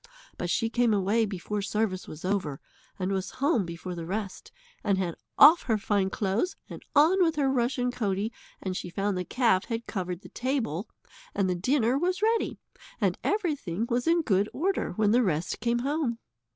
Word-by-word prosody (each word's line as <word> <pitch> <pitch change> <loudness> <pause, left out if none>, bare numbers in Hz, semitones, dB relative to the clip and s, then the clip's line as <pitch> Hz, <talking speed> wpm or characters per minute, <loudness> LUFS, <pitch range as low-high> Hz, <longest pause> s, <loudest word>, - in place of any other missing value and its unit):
But 175 - -4
she 225 +5 +1
came 235 -1 +2
away 210 +3 +2
before 205 +1 -3
service 200 -2 -1
was 155 +3 -8
over, 185 -8 -1 0.4
and 185 0 -2
was 190 -1 -1
home 260 - +2
before 170 +2 -6
the 170 -2 -6
rest, 195 +1 -4 0.3
and 200 -3 +2
had 180 -3 -1 0.2
off 320 +3 +9
her 220 - +4
fine 200 -2 +1
clothes 205 - -1
and - - -9
on 325 +7 +5
with 330 -2 +3
her 275 -3 +2
rushen 250 0 +1
coatie, 210 -2 -1 0.3
and 185 -1 -2
she 180 - -4
found 195 +2 -1
the 180 - -1
calf 225 -3 +2
had 230 0 -4
covered 180 -3 -4
the - - -12
table, 240 - -2 0.5
and 195 - +2
the 185 - +1
dinner 245 +7 +1
was 365 +4 0
ready, 450 +1 +1 0.4
and - - +1
everything 290 - -1
was 245 +3 0
in 335 0 +4
good 200 -4 +2
order 370 - -1
when 210 +2 +2
the 245 +3 +5
rest 175 -5 -1
came 235 +1 +1
home. 285 -5 0
215 Hz, 185 wpm, -28 LUFS, 190-260 Hz, 0.5 s, off